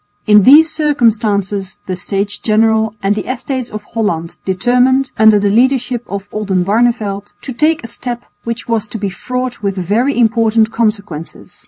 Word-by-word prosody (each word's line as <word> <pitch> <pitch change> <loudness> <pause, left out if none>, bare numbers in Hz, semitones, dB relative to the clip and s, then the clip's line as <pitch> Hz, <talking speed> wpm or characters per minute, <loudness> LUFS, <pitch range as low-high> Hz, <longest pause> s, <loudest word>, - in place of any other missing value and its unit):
In 210 0 +6
these 295 +9 +7
circumstances 215 - 0
the 185 - -3
States 200 +3 -2
General 220 0 +1
and 195 +1 +2
the 215 +4 -3
Estates 255 -1 -4
of 215 -1 -7
Holland 175 -7 -2
determined, 250 +7 +2
under 220 -1 +5
the 205 0 +1
leadership 245 +1 +1
of 200 0 -6
Oldenbarneveldt, 205 +1 -1
to 260 - -7
take 305 +4 +1
a - - -6
step 240 +1 -4 0.2
which 230 0 -5
was 225 -2 -1
to 210 - -6
be 200 -2 -3
fraught 250 +3 -4
with 200 -1 -2
very 220 +10 0
important 225 -1 +2
consequences. 205 -8 -3
220 Hz, 155 wpm, -15 LUFS, 205-245 Hz, 0.2 s, these